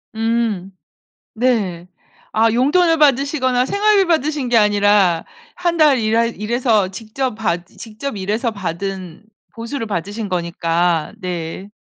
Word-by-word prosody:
음. 225 -4 -1 0.6
네. 215 -8 0 0.5
아 225 +1 +3
용돈을 325 +8 +3
받으시거나 270 -3 +2
생활비 405 +1 +3
받으신 305 -5 0
게 240 - +2
아니라 205 -5 +3 0.3
1 345 -1 -1
달 300 -5 +5
일하 225 +1 +2
일해서 225 -2 0
직접 225 +5 -4
받으 175 -5 -3
직접 225 +3 -6
일해서 210 +5 -1
받은 190 -1 -5 0.3
보수를 230 +1 -5
받으신 205 +2 -4
거니까. 170 -2 0
네. 180 +1 -5
220 Hz, 245 characters per minute, -19 LUFS, 190-255 Hz, 0.6 s, 달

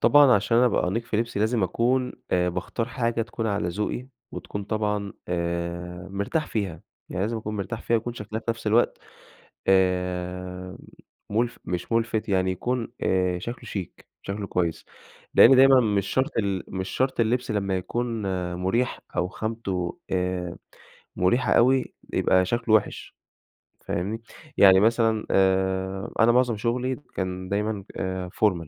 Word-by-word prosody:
طبعًا 145 -3 +7
عشان 105 +3 +2
أبقى 120 -7 +3
أنيق 115 +5 -1
في 110 - -2
لبسي 115 -2 -1
لازم 110 -1 +2
أكون 125 +7 +1 0.2
آآ، 90 0 +2
باختار 95 +7 -3
حاجة 115 -2 -1
تكون 115 0 -4
على 100 -4 0
ذوقي 105 +7 -3 0.3
وتكون 100 -1 -6
طبعًا 105 -2 -1 0.2
آآ، 85 +1 -3
مرتاح 100 +11 -1
فيها، 95 -7 -3 0.3
يعني 95 - -3
لازم 115 +3 -1
أكون 105 -1 -4
مرتاح 105 +3 -4
فيها، 115 - +2
يكون 120 +2 -3
شكلها 110 0 -5
في 115 - -2
نَفس 115 -1 -6
الوقت 110 +3 +3 0.7
آآ، 90 -1 0 0.5
مُلف 115 +3 0
مش 90 +5 -4
ملفت 115 -1 0
يعني 95 -2 +2
يكون 120 +6 -2
آآ، 90 -1 +1
شكله 120 +7 -6
شيك 95 -5 -7
شكله 100 +1 -4
كويس، 85 -3 -1 0.5
لأن 130 +3 +8
دايمًا 135 0 +7
مش 105 -4 +1
شرط 130 +4 +1
ال 100 -4 -1
مش 95 0 -4
شرط 130 +5 0
اللبس 120 +2 +1
لمّا 100 -3 0
يكون 115 +4 -2 0.3
مُريح 95 +8 0 0.2
أو 90 - +1
خامته 100 -5 -3
آآ، 90 -1 -1 0.6
مريحة 95 +8 +2
أوي 130 +2 +3 0.2
يبقى 95 0 +3
شكله 115 +2 +1
وِحِش، 110 - 0 0.7
فاهمني؟ 105 +6 -2 0.4
يعني 95 -1 +8
مثلًا 110 0 +2
آآ، 95 0 +1
أنا 115 +1 +6
معظم 125 -2 +2
شغلي 125 +4 -1 0.2
كان 95 -1 -3
دايمًا 105 0 -1
آآ، 95 -1 -3
formal 90 -6 +1
105 Hz, 145 wpm, -25 LUFS, 95-115 Hz, 0.7 s, لأن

